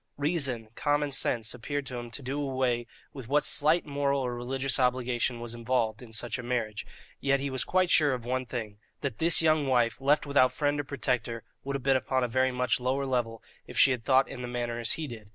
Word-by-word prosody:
Reason, 140 -7 0
common 145 +2 0
sense, 120 -4 0
appeared 140 +4 -4
to 125 - -6
him 120 -1 -6
to 130 +4 -7
do 135 +3 -3
away 130 -4 0 0.3
with 130 -5 -8
what 145 +3 +2
slight 155 +4 +3
moral 140 -1 0
or 125 -1 -2
religious 130 +2 -1
obligation 125 -1 0
was 120 -1 -5
involved 115 -2 -1
in 120 -3 -12
such 115 +2 -3
a - - -3
marriage; 120 -4 -3 0.3
yet 140 0 +2
he 140 0 -3
was 130 - +2
quite 185 -1 +1
sure 145 -4 +4
of 120 -2 -8
one 130 0 -2
thing 110 -4 -5 0.2
that 135 -7 -3
this 165 0 +4
young 155 -3 +3
wife, 120 -2 +2
left 145 +3 +3
without 140 -3 +4
friend 145 -1 0
or - - -1
protector, 125 -4 -2 0.2
would 140 0 -3
have 135 - -4
been 135 0 +3
upon 130 0 0
a - - +1
very 130 +2 +1
much 125 0 +1
lower 130 +2 0
level 120 -4 -2 0.2
if - - -8
she 135 - +7
had 125 -3 -2
thought 130 +2 +4
in 125 - -7
the 125 - -4
manner 120 -1 -3
as 115 - 0
he 160 - -4
did. 110 -6 -9
130 Hz, 225 wpm, -29 LUFS, 120-140 Hz, 0.3 s, she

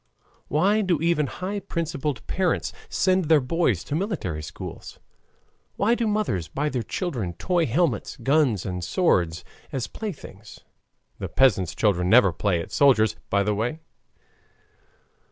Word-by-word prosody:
Why 200 +8 +2
do 180 -6 +1
even 165 -2 +1
high 190 +8 -4
principled 155 - -3
parents 185 -3 -1 0.2
send 185 -1 +2
their 155 0 +5
boys 130 - 0
to - - -6
military 155 - -2
schools? 75 - -8 0.8
Why 215 +4 +2
do 235 -1 0
mothers 205 - -1
buy 150 +2 -2
their 130 -4 -2
children 115 - -3
toy 175 - 0
helmets, 135 - 0
guns, 135 - +2
and 90 -2 -4
swords 90 - +1 0.3
as 130 -3 -2
playthings? 140 - -8 0.6
(The - - -4
peasant's 95 -10 +2
children 90 -4 +1
never 110 -6 +6
play 95 -1 0
at 85 - -9
soldiers, 115 -4 +4
by 100 0 +2
the 105 +1 0
way). 120 +10 -2
140 Hz, 135 wpm, -24 LUFS, -, 0.8 s, never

